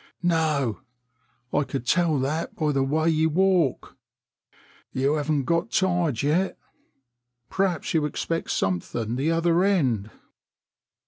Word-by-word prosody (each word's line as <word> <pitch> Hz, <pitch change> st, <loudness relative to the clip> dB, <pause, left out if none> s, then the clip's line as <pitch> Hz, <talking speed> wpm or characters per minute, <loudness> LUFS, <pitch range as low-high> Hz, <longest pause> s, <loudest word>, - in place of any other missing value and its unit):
"No, 155 Hz, -9 st, +1 dB, 0.7 s
I -, -, +2 dB
could 135 Hz, -3 st, -5 dB
tell 165 Hz, 0 st, +2 dB
that 145 Hz, +5 st, -2 dB
by 155 Hz, -2 st, 0 dB
the 135 Hz, -1 st, +1 dB
way 155 Hz, +4 st, +1 dB
you 160 Hz, 0 st, +2 dB
walk. 180 Hz, -4 st, +1 dB, 1.0 s
You 135 Hz, +3 st, +1 dB
haven't 150 Hz, -1 st, 0 dB
got 170 Hz, -, 0 dB
tired 175 Hz, -, +1 dB
yet. 170 Hz, +7 st, +1 dB, 0.9 s
Perhaps 190 Hz, -3 st, -1 dB
you 160 Hz, -2 st, +2 dB
expect 165 Hz, +2 st, -3 dB
something 110 Hz, +5 st, -1 dB
the 140 Hz, +5 st, 0 dB
other 165 Hz, +1 st, +2 dB
end?" 130 Hz, -, +1 dB
155 Hz, 120 wpm, -25 LUFS, 135-170 Hz, 1.0 s, I